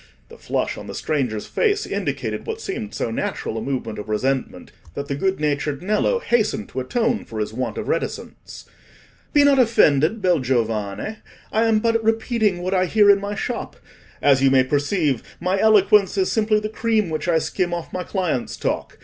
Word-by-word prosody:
The -, -, -13 dB
flush -, -, -2 dB
on -, -, -9 dB
the -, -, -7 dB
stranger's 125 Hz, -9 st, -2 dB
face 415 Hz, -1 st, 0 dB
indicated -, -, -3 dB
what 450 Hz, 0 st, -4 dB
seemed 235 Hz, -, -5 dB
so 115 Hz, -, -2 dB
natural 115 Hz, -, -3 dB
a 110 Hz, -, -3 dB
movement 115 Hz, -5 st, -3 dB
of 105 Hz, -, -8 dB
resentment, 130 Hz, +5 st, -2 dB, 0.2 s
that 140 Hz, -, -4 dB
the -, -, 0 dB
good 190 Hz, +5 st, 0 dB
natured 150 Hz, 0 st, -1 dB
Nello 215 Hz, -, +1 dB
hastened 220 Hz, -, 0 dB
to -, -, -4 dB
atone 230 Hz, -, 0 dB
for 110 Hz, -, -7 dB
his 105 Hz, 0 st, -3 dB
want 115 Hz, -3 st, -3 dB
of -, -, -4 dB
reticence. -, -, -4 dB, 0.7 s
"Be 290 Hz, -2 st, +5 dB
not 280 Hz, -1 st, +5 dB
offended, 190 Hz, -, +3 dB
bel 180 Hz, -4 st, +2 dB
giovane; 115 Hz, -, -2 dB, 0.3 s
I 220 Hz, +1 st, +2 dB
am 225 Hz, -1 st, +3 dB
but 230 Hz, +1 st, +1 dB
repeating 220 Hz, -4 st, +1 dB
what 185 Hz, +1 st, -1 dB
I 185 Hz, -1 st, +2 dB
hear 205 Hz, +1 st, +6 dB
in 200 Hz, 0 st, +3 dB
my 205 Hz, +1 st, -4 dB
shop; 235 Hz, +3 st, -4 dB, 0.5 s
as 135 Hz, -2 st, +5 dB
you 135 Hz, -, +5 dB
may 130 Hz, -1 st, +5 dB
perceive, 145 Hz, -, 0 dB, 0.2 s
my 185 Hz, +3 st, 0 dB
eloquence 210 Hz, -2 st, +4 dB
is 190 Hz, -1 st, +1 dB
simply 215 Hz, -1 st, +2 dB
the 210 Hz, -, -3 dB
cream 220 Hz, -4 st, 0 dB
which 155 Hz, +3 st, -3 dB
I 170 Hz, -2 st, +3 dB
skim 175 Hz, +2 st, -1 dB
off 170 Hz, -1 st, -5 dB
my 185 Hz, -, -2 dB
clients' 180 Hz, -, -2 dB
talk. -, -, -3 dB
185 Hz, 190 wpm, -22 LUFS, 135-220 Hz, 0.7 s, hear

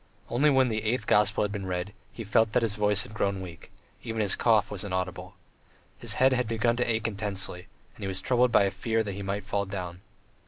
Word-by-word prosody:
Only 140 Hz, +6 st, +4 dB
when 135 Hz, -2 st, +4 dB
the 110 Hz, -1 st, -1 dB
eighth 115 Hz, +2 st, -1 dB
gospel 105 Hz, 0 st, +3 dB
had 105 Hz, -, -1 dB
been 100 Hz, -2 st, -4 dB
read, 90 Hz, +2 st, -3 dB, 0.2 s
he 115 Hz, -, -7 dB
felt 110 Hz, +1 st, +2 dB
that 125 Hz, -, +3 dB
his 110 Hz, -3 st, 0 dB
voice 105 Hz, +1 st, +1 dB
had 125 Hz, -, -12 dB
grown 100 Hz, -2 st, -1 dB
weak, 90 Hz, -3 st, -9 dB, 0.3 s
even 110 Hz, 0 st, -4 dB
his 100 Hz, -3 st, +2 dB
cough 110 Hz, -4 st, +3 dB
was 100 Hz, -2 st, -3 dB
inaudible. 95 Hz, -2 st, -4 dB, 0.6 s
His -, -, -2 dB
head 130 Hz, 0 st, +4 dB
had 125 Hz, -2 st, 0 dB
begun 115 Hz, +1 st, +1 dB
to 125 Hz, -, 0 dB
ache 110 Hz, -1 st, 0 dB
intensely, 100 Hz, -4 st, -3 dB, 0.3 s
and -, -, -11 dB
he -, -, -2 dB
was 95 Hz, -1 st, -1 dB
troubled 125 Hz, -1 st, +2 dB
by -, -, +5 dB
a 100 Hz, -, +1 dB
fear 110 Hz, +3 st, 0 dB
that 105 Hz, -, -4 dB
he 100 Hz, -, -6 dB
might 100 Hz, +1 st, -3 dB
fall 100 Hz, 0 st, -2 dB
down. 90 Hz, -2 st, -6 dB
105 Hz, 230 wpm, -28 LUFS, 95-115 Hz, 0.6 s, by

